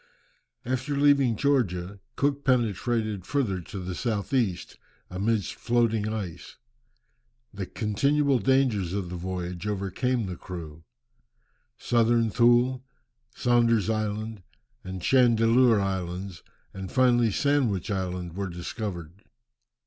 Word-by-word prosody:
After 130 +3 -2
leaving 140 -4 +4
Georgia, 100 -8 0 0.2
Cook 140 0 0
penetrated 115 -4 0
further 105 -7 -1
to 90 - -9
the 90 -1 -4
south 110 +4 -3
east, 105 -9 -1 0.3
amidst 100 +1 -1
floating 115 -3 0
ice. 95 -6 -6 1.0
The - - -5
continual 140 +6 +1
dangers 110 -6 +1
of 95 -3 -3
the - - -4
voyage 90 0 -5
overcame 105 +5 -1
the 90 -2 -6
crew. 80 -3 -9 0.9
Southern 115 -1 +2
Thule, 120 +2 +3 0.5
Saunder's 115 -3 +2
Island, 110 0 -3 0.4
and 95 -1 -7
Chandeleur 120 -2 +4
Islands, 95 -1 -3 0.3
and 95 -1 -7
finally 120 -3 +4
Sandwich 120 - 0
Land 90 -3 -3
were 100 -1 -3
discovered. 90 0 -6
110 Hz, 105 wpm, -26 LUFS, 95-120 Hz, 1.0 s, leaving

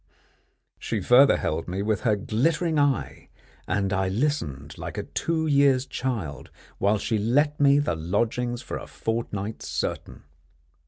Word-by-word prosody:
She 110 - -2
further 125 +8 +6
held 80 +2 -2
me 95 +3 -2
with 110 -1 0
her 110 -3 +2
glittering 150 - 0
eye, 145 -2 -1 0.4
and 100 -1 0
I 95 0 +1
listened 95 - -2
like - - -6
a - - -2
two 160 -1 -2
years' 140 -3 +3
child 95 - -4 0.3
while 100 +2 +3
she 110 +1 -1
let 145 +8 +1
me 140 -1 +5
the 145 - +1
lodgings 115 +9 -1
for - - -5
a - - -10
fortnight 110 -2 -4
certain. - - -4
115 Hz, 145 wpm, -25 LUFS, 100-140 Hz, 0.4 s, further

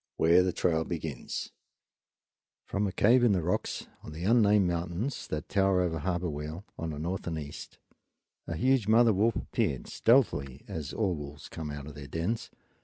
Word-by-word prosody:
Where 85 +3 +5
the 90 0 +1
Trail 80 -2 +1
Begins 80 -6 -5 1.1
From 100 +1 -1
a - - -2
cave 120 +6 +4
in 115 -4 +5
the 90 -3 0
rocks, 90 - -1 0.2
on 75 - -9
the 80 +3 -6
unnamed 105 -2 +5
mountains 85 +9 -2
that 75 +2 -4
tower 95 -2 +3
over 85 -3 -1
Harbor 90 +2 -1
Weal 75 +4 -5
on 80 - -4
the 75 - -5
north 85 +5 -3
and 80 -2 -2
east, 75 -2 -8 0.7
a 80 - -3
huge 125 +2 +2
mother 115 +1 +6
wolf 105 +3 +2
appeared, - - -1
stealthily, 75 - +2
as 75 -2 -5
all 100 -5 0
wolves 75 -2 -8
come 80 -2 -6
out 75 -1 -6
of 75 - -9
their 70 -1 -9
dens. 85 - -2
85 Hz, 180 wpm, -29 LUFS, 75-100 Hz, 1.1 s, mother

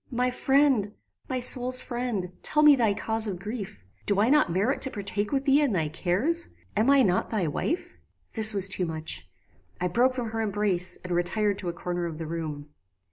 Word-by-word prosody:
"My 250 0 -1
friend! 265 -6 +1 0.3
my 255 - -2
soul's 250 0 +3
friend! 240 -7 -3
tell 300 0 +2
me 300 -1 +8
thy 225 -6 +1
cause 220 +1 -1
of 190 -3 -4
grief. 200 - -7 0.2
Do 200 -1 +1
I 225 +5 +3
not 300 - +3
merit 205 +10 0
to 265 - +1
partake 205 -1 -4
with 275 -1 -1
thee 280 +2 +4
in 280 -7 +1
thy 160 -5 -1
cares? 200 - -1 0.3
Am 220 +5 +2
I 280 -1 +5
not 185 -4 0
thy 210 -6 -1
wife?" 295 - -3 0.4
"This 220 -1 +8
was 195 -2 +2
too 185 -2 -1
much. 155 - -5 0.5
I 180 - 0
broke 250 +8 +1
from 235 -3 -4
her 225 0 -3
embrace, 200 -4 +2
and 180 - -7
retired 200 +4 0
to 180 - -4
a - - -4
corner 175 0 -4
of 160 -2 -7
the 165 - -6
room. 155 -2 -6
210 Hz, 200 wpm, -26 LUFS, 180-250 Hz, 0.5 s, me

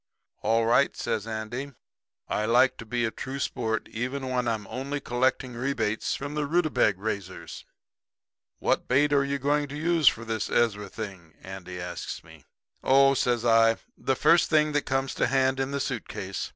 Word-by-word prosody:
"'All 115 0 +2
right,' 125 +4 +3
says 110 0 -2
Andy. 115 +6 -5 0.5
'I 105 - -1
like 120 +3 +4
to 115 - -9
be 120 +1 0
a 110 - -1
true 130 +4 -6
sport 115 -5 -2
even 130 +3 -3
when 125 -1 0
I'm 110 -3 -1
only 140 +6 -4
collecting 130 0 0
rebates 120 -3 -1
from 140 +1 -5
the 150 -1 -1
rutabag 155 - +2
raisers. 100 -3 -5 0.9
What - - 0
bait 145 +3 +3
are 140 -1 +4
you 140 0 -1
going 145 +2 +1
to 145 +1 -7
use 165 -1 +2
for 115 - +4
this 110 -2 -2
Ezra 105 -4 +1
thing?' 95 -7 -8
Andy 95 -1 -8
asks 90 0 -6
me. - - -16 0.4
"'Oh,' 135 +1 +6
I - - +2
says, 120 -3 +1
'the 115 +3 +2
first 165 +4 +4
thing 155 -1 +3
that 145 0 -1
come 135 0 +1
to 135 - -1
hand 135 0 +2
in 135 0 0
the 140 0 -2
suit - - -3
case. - - -5
125 Hz, 180 wpm, -27 LUFS, 110-140 Hz, 0.9 s, Oh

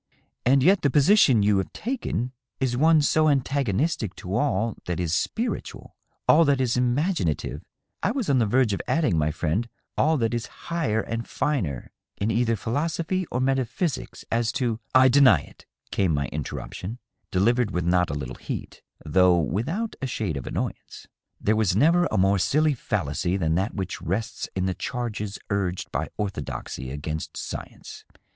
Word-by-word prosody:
" - - -50
And 135 +1 +5
yet 190 +4 +5
the 140 - +3
position 140 - +5
you 100 -1 +3
have 95 - -3
taken 225 - -3 0.3
is 130 -2 0
one 155 +3 +5
so 155 +1 +3
antagonistic 135 - 0
to 95 +3 -5
all 115 -5 +1
that 90 -1 -2
is 85 -3 -1
spiritual 230 - -3 0.2
— - - -47
all 165 - +7
that 140 -2 +3
is 125 -2 +1
im 125 -1 +2
aginative 150 - -1 0.2
— - - -52
I - - +1
was 260 -6 -2
on 135 -2 +3
the 115 - +2
verge 120 -1 +3
of - - -2
adding, 155 - +2
my 75 -1 +2
friend, 85 +9 -1 0.3
all 155 +1 +3
that 115 -2 0
is 120 -1 -2 0.3
higher 130 -11 +1
and 115 +1 -4
finer 95 - -2 0.3
in 105 +3 0
either 115 +1 +2
philosophy 165 - -1
or 125 - -1
metaphysics, 130 +1 -1
as 115 0 +1
to 115 -4 -1
— - - -45
" - - -38
" - - -10
I 130 0 +8
deny 135 +1 +6
it," - - -17 0.2
came 90 -6 +1
my 70 -1 0
interruption, 105 +6 -5 0.3
delivered 115 +5 +2
with 90 -3 -2
not 90 0 +2
a 70 - -3
little 65 -3 -5
heat, - - -6 0.2
though 90 +3 +4
without 120 - -1
a 135 - -1
shade 105 - -2
of 70 - -5
annoyance. - - -5 0.2
" - - -53
There 110 - +2
was 105 -4 +2
never 165 - +4
a - - -1
more 95 +1 +3
silly 150 - +3
fallacy 90 - -1
than 80 -4 0
that 95 +6 -1
which 95 -2 -4
rests 105 +6 -3
in 95 -1 0
the 95 - 0
charges 110 -3 -4
urged 95 -3 -1
by - - -2
orthodoxy 75 -8 -4
against 75 +3 -5
science. - - -7
115 Hz, 185 wpm, -25 LUFS, 95-140 Hz, 0.3 s, I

